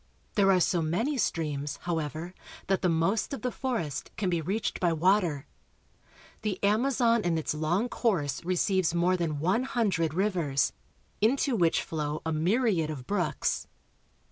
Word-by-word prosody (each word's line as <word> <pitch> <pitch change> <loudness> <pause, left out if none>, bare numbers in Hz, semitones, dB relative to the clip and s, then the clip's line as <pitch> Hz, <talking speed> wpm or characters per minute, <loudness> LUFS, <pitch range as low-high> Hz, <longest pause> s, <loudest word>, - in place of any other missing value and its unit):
There 195 -2 +4
are 185 - +4
so 175 0 +2
many 215 - 0
streams, 150 -7 -1
however, 165 0 -3 0.3
that 195 0 +1
the 180 - +2
most 170 +10 +1
of - - -11
the 250 - 0
forest 200 - -3
can 190 -4 0
be 170 -2 0
reached 200 +7 -2
by 175 -2 +2
water. 165 -4 +2 1.0
The 210 -3 -2
Amazon 235 +2 +3
in 175 -4 0
its 160 - -1
long 165 +9 0
course 175 - -1
receives 185 0 +1
more 175 +2 +3
than 165 -4 -1
one 185 +10 +2
hundred 195 - 0
rivers, 170 -9 +1 0.5
into 255 +4 +2
which 170 -6 +2
flow 150 -1 -3
a 160 - 0
myriad 180 0 +1
of 140 -5 -6
brooks. 175 -1 -1
175 Hz, 150 wpm, -28 LUFS, 160-210 Hz, 1.0 s, There